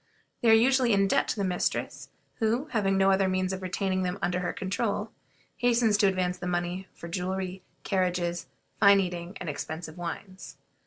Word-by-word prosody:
They 235 - +4
are - - +8
usually 245 +1 +4
in 195 0 +3
debt - - +2
to - - -1
the 200 - -2
mistress, 180 -2 -2 0.3
who, 230 +5 +1
having 195 -5 +1
no 195 0 +4
other 190 0 +3
means 185 0 0
of 190 - -5
retaining 185 +1 -1
them 180 +1 -2
under 180 -2 0
her 180 - -2
control, 190 0 -2 0.5
hastens 235 -3 +3
to 205 - +4
advance 180 -1 0
them 180 - -3
money 175 +2 -2
for 170 - -9
jewelry, 185 +1 -3 0.2
carriages, 180 -3 -1 0.3
fine 200 -1 +7
eating, 180 -1 -3
and 180 - -6
expensive 160 +3 -5
wines. 185 +2 -7
190 Hz, 175 wpm, -28 LUFS, 180-200 Hz, 0.5 s, are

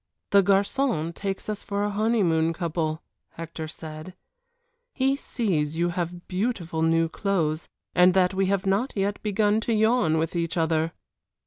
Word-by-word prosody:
"The 200 - +7
garçon 195 - +1
takes 195 +2 -4
us 210 -1 -3
for 200 0 -2
a 205 - 0
honeymoon 195 -7 +2
couple," 160 -2 -2 0.3
Hector 165 -1 -6
said; 155 +3 -8 0.8
"he 270 0 +2
sees 165 - -1
you 175 +1 +1
have 175 0 -4
beautiful 180 -5 -2
new 165 0 +3
clothes, 165 -3 -1 0.2
and 180 +1 +5
that 185 0 +3
we 190 0 +1
have 195 0 0
not 200 +7 +1
yet 200 0 -1
begun 210 +1 +1
to 230 - -1
yawn 220 -7 +3
with 165 +2 -1
each 170 0 -1
other." 160 0 +1
180 Hz, 150 wpm, -25 LUFS, 165-205 Hz, 0.8 s, The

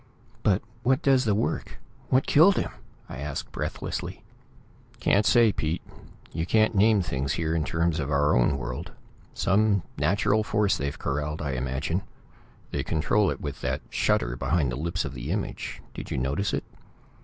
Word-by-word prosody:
"But 95 0 +2 0.2
what 130 +2 +2
does 135 -2 +4
the 105 -2 +2
work; 110 - -2 0.3
what 130 +1 +3
killed 175 +6 +6
him?" - - -1 0.4
I - - -7
asked 75 0 -4
breathlessly. - - -4 0.8
"Can't 100 +1 +3
say, 120 -3 +6
Pete. 80 -3 -2 0.5
You 80 +1 -3
can't 110 +2 +3
name 105 -1 +4
things 70 -3 -2
here 80 -1 -1
in 80 -2 +1
terms 80 +1 0
of 70 -2 -2
our 75 0 +3
own 60 +3 +3
world. 60 -1 -5 0.4
Some 100 -1 +2 0.2
natural 100 +8 +2
force 105 -1 +2
they've 70 0 -3
corraled, 75 +2 -2
I 70 -2 -2
imagine. 65 +7 -1 0.7
They - - -1
control 95 +6 +2
it - - -4
with 70 -3 -5
that 65 +1 -2
shutter - - +1
behind 75 -1 +1
the - - -3
lips 85 +5 -2
of - - -5
the 65 +2 -6
image. 100 +3 -3
Did - - -7
you - - -2
notice 70 +10 0
it?" - - -1
80 Hz, 165 wpm, -27 LUFS, 70-105 Hz, 0.8 s, killed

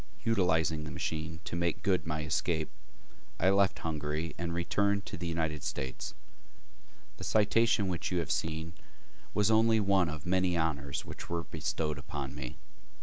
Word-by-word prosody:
Utilizing 80 -7 +2
the 75 - -5
machine 80 +1 -3
to - - -3
make 85 -1 0
good 95 -4 +2
my 75 -1 -1
escape, 75 - 0 0.7
I 95 +2 +5
left 100 -1 +4
Hungary 75 0 -2
and 85 0 -3
returned 100 +4 +1
to - - -5
the 85 +1 -4
United 80 -3 -1
States. 65 0 -4 1.0
The - - -7
citation 110 -1 +3
which 90 0 -2
you 90 - +1
have 85 -5 0
seen 80 +2 -1 0.6
was 105 +1 +4
only 110 0 +5
one 95 -4 +3
of 75 -2 -5
the - - -5
many 90 -1 +3
honors 70 -4 -1
which - - -8
were 85 -1 -1
bestowed 75 -1 -2
upon 70 -1 -5
me. 70 -4 -6
85 Hz, 160 wpm, -32 LUFS, 75-95 Hz, 1.0 s, I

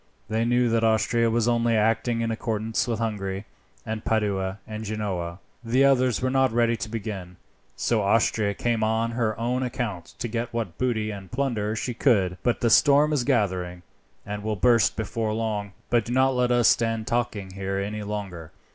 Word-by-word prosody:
They 110 +1 0
knew 120 +1 +3
that 115 0 +1
Austria 115 +1 +2
was 115 0 +1
only 120 -1 +2
acting 115 +2 +1
in 115 0 -1
accord 110 -1 -2 0.2
with 115 -2 -1
Hungary, 100 -3 -3 0.4
and 110 0 -4
Padua, 100 -3 0
and 110 0 -6
Genoa. 100 -5 -3 0.3
The 125 +4 +3
others 130 -3 +3
were 130 - +1
not 135 -1 +3
ready 115 0 +2
to 110 -1 -5
begin, 100 -5 -6 0.4
so 115 -3 +1
Austria 105 0 +2
came 115 0 0
on 110 +1 +1
her 115 -2 -1
own 125 +2 0
account 120 -8 -4
to - - -3
get 115 +1 -3
what 115 -8 -4
booty 110 -4 0
and 100 -3 -9
plunder 115 -5 -1
she 125 +2 -3
could. 100 -8 +2
But 120 - 0
the 115 - +2
storm 145 +3 +5
is 140 -5 +1
gathering, 95 -8 0 0.4
and 105 0 -5
will 110 +1 -2
burst 115 0 +3
before 110 0 -2
long. 105 -3 -2 0.2
But 120 -3 +3
do 120 - -3
not 130 +1 +3
let 125 -1 +1
us 120 -2 +4
stand 115 -1 +2
talking 115 -5 -2
here 95 0 -3
any 105 +2 -3
longer. 100 -6 -6
110 Hz, 180 wpm, -25 LUFS, 105-120 Hz, 0.4 s, storm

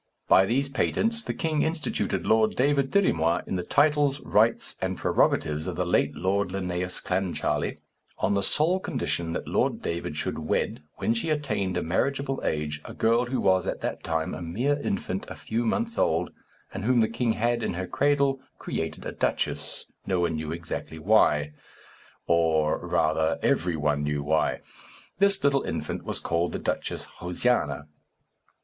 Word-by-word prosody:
By 95 - +6
these 135 +5 +1
patents 225 - 0
the - - -3
king 155 -3 0
instituted 160 -1 -1
Lord 110 0 +3
David 140 +1 +2
Dirry 200 +3 +3
Moir 85 +1 +1
in - - -3
the 90 - 0
titles, 145 - +2
rights, 110 +3 +2
and - - -1
prerogatives 75 +2 +1
of 90 - -3
the 90 - -1
late 75 -4 +1
Lord 100 +1 0
Linnæus 90 -1 -3
Clancharlie, 95 -1 -1 0.4
on 100 - +1
the 100 - +2
sole 160 - +3
condition 85 - -2
that - - -4
Lord - - 0
David 85 -3 -3
should - - -2
wed, 75 - -1
when 115 - 0
she 115 +8 -2
attained 115 -11 -1
a - - -1
marriageable 135 +10 -1
age, 75 0 -2
a - - -9
girl 115 +2 +2
who 130 +1 -1
was, 95 -1 +3
at - - -3
that - - -3
time, 80 -1 -1
a - - -6
mere 120 - 0
infant 95 -3 -2
a - - -6
few 115 +2 -2
months 230 - -1
old, 80 0 +1 0.4
and 95 - -4
whom 120 +1 +3
the 110 - +3
king 115 0 0
had, 120 +2 0
in 90 - -2
her 95 +1 -3
cradle, 140 +2 +2 0.2
created - - -4
a - - -3
duchess, - - -2 0.2
no 95 -2 +1
one 85 -2 +1
knew 80 0 -4
exactly 85 -1 -5
why; 75 -5 +3 0.7
or, 80 -2 +2
rather, 80 +1 +1
every 90 -1 +2
one 75 -1 0
knew 75 0 -1
why. 80 +1 +1 0.6
This 200 0 +3
little 140 -1 +3
infant - - -4
was - - -3
called 85 +1 -1
the - - -1
Duchess - - -3
Josiana. 90 -5 0
95 Hz, 170 wpm, -27 LUFS, 80-135 Hz, 0.7 s, By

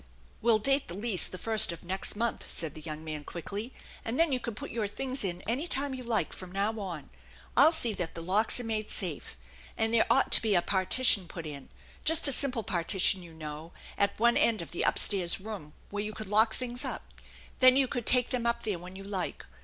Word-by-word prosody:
"We'll 230 -1 +4
date 270 +5 +1
the 175 - -7
lease 205 -2 -1
the 185 - -9
first 220 -2 +4
of 170 - -10
next 190 +3 -3
month," 230 +2 -3
said 160 -3 -3
the 155 - -11
young 155 0 -7
man 155 -2 -6
quickly; 200 - -7 0.2
" - - -19
and 230 +3 -4
then 330 -2 +3
you 255 - 0
can 235 -2 -6
put - - -8
your 220 -2 -2
things 260 +5 -4
in 180 -2 -4
any 260 +9 -1
time 275 -2 -1
you 255 -1 -7
like 230 -3 -1
from 185 -1 -10
now 205 +3 -1
on. 175 -8 -7 0.4
I'll 290 +5 +6
see 240 -9 +1
that 175 -4 -5
the 165 - -6
locks 205 +7 +1
are - - -5
made 215 -2 -3
safe, 175 - -4 0.4
and 225 0 -1
there 230 - +3
ought 270 - +2
to - - +7
be 215 -3 +1
a 175 - +4
partition 195 0 +2
put 165 -1 -8
in 145 -3 -9 0.3
just 320 -1 +8
a - - +5
simple 255 -3 0
partition, 185 0 +1
you 170 -2 -13
know 155 +1 -8 0.2
at 200 0 0
one 235 +1 +3
end 220 -6 +2
of - - -12
the 175 - -3
up - - +2
stairs 185 -4 +4
room, 190 -7 -8 0.2
where 205 0 -3
you 215 0 -5
could 215 - -7
lock 215 +3 +3
up - - -6
things. 245 0 -5 0.8
Then 255 0 +6
you 275 -1 +2
could 240 -2 -5
take 250 -1 +8
them 245 -2 -1
up 235 - -1
there 205 -6 -3
when 180 +2 -11
you 195 - -9
like. 195 -3 -5
210 Hz, 235 wpm, -29 LUFS, 180-235 Hz, 0.8 s, just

